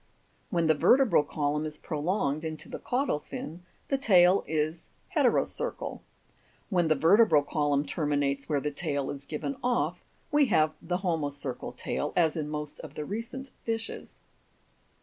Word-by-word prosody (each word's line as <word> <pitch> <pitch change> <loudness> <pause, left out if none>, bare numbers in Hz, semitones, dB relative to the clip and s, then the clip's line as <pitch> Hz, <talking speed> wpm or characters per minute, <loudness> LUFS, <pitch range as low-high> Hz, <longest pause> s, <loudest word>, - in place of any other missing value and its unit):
When 170 -4 +1
the 160 - +5
vertebral 245 - +5
column 150 0 -1
is 155 -1 -5
prolonged 155 -1 -1
into 155 -1 -5
the - - -6
caudal 250 - 0
fin, 160 +3 -7 0.3
the 275 - +1
tail 185 -5 +5
is 155 +1 -2 0.3
he'terocercal; - - 0 0.7
when 175 -3 +3
the 155 - +4
vertebral 165 +1 +5
column 145 -1 +1
terminates 145 -2 -1
where 145 -2 +2
the 150 +1 -2
tail 145 -2 -2
is 140 0 -8
given 260 - -4
off, 245 0 0 0.3
we 295 -2 +4
have 155 -7 +3
the 180 +2 -2
homocercal 145 -6 -3
tail, - - -2
as 160 -3 +3
in 150 -2 -3
most 150 -1 -5
of 155 -1 -10
the 150 - -4
recent 245 - -5
fishes. 225 -1 -4
155 Hz, 150 wpm, -29 LUFS, 145-195 Hz, 0.7 s, the